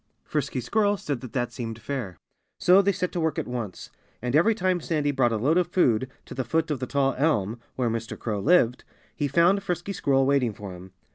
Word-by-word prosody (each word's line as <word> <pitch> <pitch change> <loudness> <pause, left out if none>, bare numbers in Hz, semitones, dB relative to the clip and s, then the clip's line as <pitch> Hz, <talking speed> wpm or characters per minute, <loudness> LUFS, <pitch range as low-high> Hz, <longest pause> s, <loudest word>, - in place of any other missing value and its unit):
Frisky 140 -3 -2
Squirrel 205 - +1
said 145 -9 -4
that 125 - -8
that 120 -2 -1
seemed 115 -2 -5
fair. 115 -8 -5 0.4
So 185 +2 +6
they 200 0 +2
set 180 -1 -2
to 175 - -3
work 160 -2 0
at - - -2
once. 120 -6 -5 0.3
And 125 +3 -2
every 215 +9 +4
time 185 -3 0
Sandy 150 -3 0
brought 130 -4 +2
a 110 - 0
load 150 +10 +3
of 180 - +1
food 130 -9 +2 0.2
to - - -9
the 130 - -2
foot 160 +6 0
of 145 - -1
the 130 - -3
tall 135 0 +1
elm, 120 -7 +1 0.2
where 125 -2 0
Mr. 115 0 -3
Crow 105 -3 -3
lived, 125 - +3 0.3
he 145 - -1
found 170 +7 +3
Frisky 180 +1 -3
Squirrel 135 -6 +2
waiting 135 -5 +2
for 100 -2 -8
him. 90 +1 -11
140 Hz, 220 wpm, -26 LUFS, 120-170 Hz, 0.4 s, So